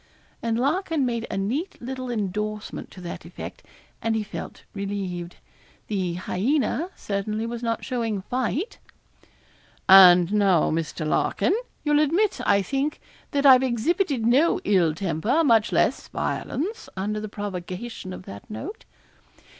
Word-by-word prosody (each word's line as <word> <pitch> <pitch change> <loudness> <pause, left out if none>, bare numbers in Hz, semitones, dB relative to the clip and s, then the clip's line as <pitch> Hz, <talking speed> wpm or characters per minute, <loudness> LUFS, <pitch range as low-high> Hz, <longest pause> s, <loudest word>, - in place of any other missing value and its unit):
And 230 -1 0
Larkin 305 +2 +1
made 235 -1 -2
a - - -3
neat 250 - -2
little 255 +1 -5
endorsement 210 -1 -3
to 185 - -12
that 175 - -6
effect, - - -8 0.4
and 225 -1 0
he 220 - 0
felt 210 - -8
relieved. 195 -3 -4 0.5
The 185 -5 -1
hyaena 260 - 0
certainly 210 +2 -2
was 235 0 -4
not 230 -1 -2
showing 230 -6 -2
fight. 260 - -2 1.1
'And 180 -1 +8
now, 195 -5 +3
Mr. 160 0 -2
Larkin, 270 - +1 0.3
you'll 295 -1 +3
admit, 345 +8 +2
I 200 -1 +4
think, 275 +6 -1 0.3
that 285 0 0
I've 260 -2 +9
exhibited 265 - 0
no 270 +8 +4
ill 175 -6 +3
temper, 195 - +1
much 225 -7 +4
less - - +1
violence, 360 - -3
under 210 +3 -1
the 215 0 -5
provocation 195 +1 -6
of 185 - -8
that 100 - -10
note.' 380 - -7
220 Hz, 135 wpm, -25 LUFS, 195-265 Hz, 1.1 s, I've